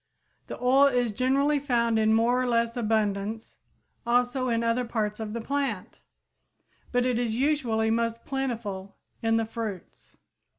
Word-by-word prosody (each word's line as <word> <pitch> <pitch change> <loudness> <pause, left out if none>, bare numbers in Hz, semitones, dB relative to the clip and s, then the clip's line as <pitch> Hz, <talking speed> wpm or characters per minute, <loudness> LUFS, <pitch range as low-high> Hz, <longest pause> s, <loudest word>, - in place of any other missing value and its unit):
The - - -7
oil 265 +3 +5
is 245 -4 +1
generally 275 +6 +2
found 235 -5 +1
in 220 0 +3
more 240 +3 +2
or 255 - -1
less 235 -1 +1
abundance 220 -1 -1 0.4
also 245 +2 +1
in 230 0 0
other 230 +2 +1
parts 215 -3 -2
of 215 -1 -5
the 235 - -3
plant, 270 -6 -3 0.9
but 245 0 +1
is 240 -3 0
usually 240 -5 +1
most 230 0 -1
plentiful 225 -8 -4 0.2
in 225 0 +2
the 225 0 +1
fruits. 220 -5 -7
235 Hz, 140 wpm, -27 LUFS, 220-250 Hz, 0.9 s, oil